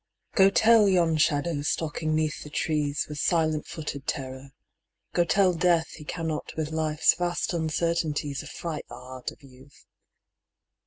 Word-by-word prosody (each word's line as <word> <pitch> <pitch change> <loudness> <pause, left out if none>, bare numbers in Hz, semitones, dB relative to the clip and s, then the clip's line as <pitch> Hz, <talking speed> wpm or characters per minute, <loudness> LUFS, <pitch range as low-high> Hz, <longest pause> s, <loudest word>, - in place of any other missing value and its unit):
Go 195 -2 +6
tell 220 +1 +5
yon 170 -4 +3
shadow 150 0 +1
stalking 155 +1 -1
'neath 155 -1 -1
the 150 - -9
trees 150 -1 -1
With 150 -1 -6
silent 155 -3 +1
footed 150 -4 -6
terror, 130 0 -4 0.6
go 175 - +3
tell 185 +1 +3
Death 170 -1 +2
He 150 - -11
cannot 160 -1 -4
with 155 -1 -2
Life's 155 -1 +2
vast 175 +1 -2
uncertainties 160 -3 -1
Affright 155 0 -6
the - - -8
heart 130 0 -7
of - - -15
Youth 135 +1 -18
155 Hz, 145 wpm, -27 LUFS, 145-170 Hz, 0.6 s, Go